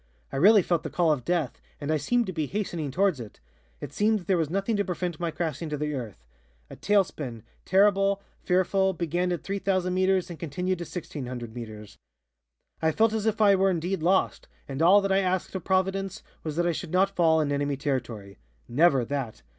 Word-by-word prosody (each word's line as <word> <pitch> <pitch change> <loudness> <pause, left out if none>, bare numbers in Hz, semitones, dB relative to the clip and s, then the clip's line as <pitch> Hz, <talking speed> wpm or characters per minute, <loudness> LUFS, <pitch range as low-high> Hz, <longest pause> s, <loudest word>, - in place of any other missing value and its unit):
I - - -3
really 200 +6 +6
felt 170 -2 0
the - - -5
call 170 -3 +2
of 140 -5 -1
death 170 -3 -1 0.2
and 145 +1 -3
I 155 - +2
seemed 240 - +1
to 185 - -5
be 155 -3 -2
hastening 175 -6 -3
towards 185 +1 +1
it. 115 -3 -10 0.4
It - - -8
seemed 215 +4 +2
that 180 - -9
there 190 - +2
was 160 -4 0
nothing 195 +5 -1
to 200 - +1
prevent 180 -3 -3
my 170 -1 -1
crashing 160 -1 -3
to 150 - -3
the 150 +1 -2
earth. 110 - -7 0.5
A - - -8
tail 205 -1 +3
spin, 125 - -8 0.2
terrible, 195 0 +3 0.2
fearful, 190 +1 +2
began 175 +1 -1
at 175 - -3
3,000 190 -2 -1
meters 185 -1 +1
and 165 - -9
continued 180 +3 -2
to 170 - -4
1,600 125 -9 -6
meters. 110 -3 -9 0.8
"I 160 - +3
felt 220 +5 +2
as 220 0 -1
if 220 0 0
I 200 -2 +6
were 195 0 +3
indeed 180 0 -1
lost, 185 +4 +1 0.2
and 135 +2 -4
all 190 +5 +6
that 195 0 -1
I 195 - +4
asked 185 -1 -1
of 190 -3 -4
Providence 190 +1 0 0.2
was 155 -2 -4
that 175 +1 +1
I 175 - +2
should 165 0 -5
not 195 +2 +2
fall 160 -2 +4
in 150 -2 0
enemy 145 0 -1
territory. 120 -8 -4 0.3
Never 135 0 +3
that! 135 -4 -4
175 Hz, 210 wpm, -27 LUFS, 145-195 Hz, 0.8 s, really